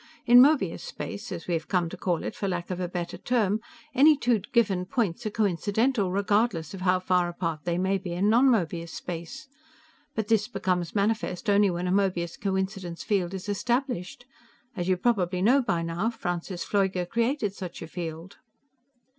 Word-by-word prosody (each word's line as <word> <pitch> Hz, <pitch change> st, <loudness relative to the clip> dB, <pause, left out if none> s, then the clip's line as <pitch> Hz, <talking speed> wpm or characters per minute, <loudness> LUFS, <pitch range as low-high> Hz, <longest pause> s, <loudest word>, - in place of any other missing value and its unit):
In 240 Hz, +1 st, +8 dB
Möbius 260 Hz, -, +3 dB
space 220 Hz, +4 st, -7 dB
as 170 Hz, -2 st, -6 dB
we 175 Hz, -, -1 dB
have 165 Hz, 0 st, -2 dB
come 180 Hz, -3 st, +1 dB
to -, -, -7 dB
call 175 Hz, -3 st, -1 dB
it -, -, -4 dB
for 200 Hz, -, -3 dB
lack 175 Hz, -1 st, -3 dB
of 180 Hz, -, -3 dB
a 180 Hz, -, -1 dB
better 175 Hz, -1 st, -5 dB
term 220 Hz, -4 st, +1 dB, 0.3 s
any 290 Hz, +3 st, +6 dB
two 240 Hz, -4 st, +2 dB
given 200 Hz, -7 st, +2 dB
points 215 Hz, +2 st, -1 dB
are -, -, 0 dB
coincidental, 210 Hz, +2 st, +1 dB
regardless 200 Hz, -4 st, +1 dB
of 190 Hz, -, -7 dB
how 185 Hz, 0 st, +3 dB
far 180 Hz, -1 st, +1 dB
apart 165 Hz, -3 st, -4 dB
they 175 Hz, -1 st, 0 dB
may 190 Hz, +2 st, +1 dB
be 180 Hz, -2 st, -5 dB
in 185 Hz, +4 st, +1 dB
non 235 Hz, +5 st, +5 dB
Möbius 170 Hz, -7 st, 0 dB
space. 170 Hz, -, -7 dB, 0.7 s
But 220 Hz, -2 st, -1 dB
this 215 Hz, -2 st, +2 dB
becomes 180 Hz, -7 st, -2 dB
manifest 205 Hz, -1 st, 0 dB
only 200 Hz, 0 st, +4 dB
when 175 Hz, 0 st, -2 dB
a -, -, 0 dB
Möbius 185 Hz, -3 st, 0 dB
coincidence 190 Hz, -3 st, -2 dB
field 195 Hz, -3 st, 0 dB
is 190 Hz, +1 st, -7 dB
established. 240 Hz, 0 st, -2 dB, 0.5 s
As 175 Hz, -3 st, -3 dB
you 185 Hz, -, +3 dB
probably 185 Hz, -5 st, +1 dB
know 260 Hz, +6 st, +5 dB
by 175 Hz, -9 st, -1 dB
now, 170 Hz, +7 st, -1 dB
Francis 175 Hz, -4 st, -4 dB
Pfleuger 190 Hz, -3 st, 0 dB
created 230 Hz, 0 st, 0 dB
such 185 Hz, -4 st, -7 dB
a -, -, -7 dB
field." 165 Hz, +2 st, -7 dB
190 Hz, 180 wpm, -27 LUFS, 175-220 Hz, 0.7 s, In